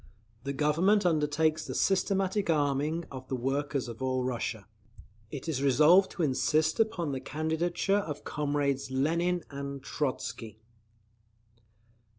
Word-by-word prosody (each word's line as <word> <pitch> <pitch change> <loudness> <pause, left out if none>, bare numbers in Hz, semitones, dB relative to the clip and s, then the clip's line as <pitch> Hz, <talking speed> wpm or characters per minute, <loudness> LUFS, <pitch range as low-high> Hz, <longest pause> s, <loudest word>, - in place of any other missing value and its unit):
The 140 - -2
Government 165 +9 +2
undertakes 155 -1 +1
the - - -5
systematic 195 0 +1
arming 150 +2 +1
of 130 -1 -8
the 130 - -2
workers 135 +2 -1
of 115 +1 -8
all 130 -1 0
Russia. 120 -4 -3 0.6
It 140 +4 -7
is 145 -5 -1
resolved 150 +8 +5
to 175 - -2
insist 155 +3 +1
upon 175 -9 +1
the 135 - -2
candidature 160 +7 0
of 150 -7 -5
comrades 145 -2 -1
Lenin 170 +6 0
and 140 -1 -6
Trotzky. 115 -6 -4
150 Hz, 125 wpm, -29 LUFS, 135-170 Hz, 0.6 s, resolved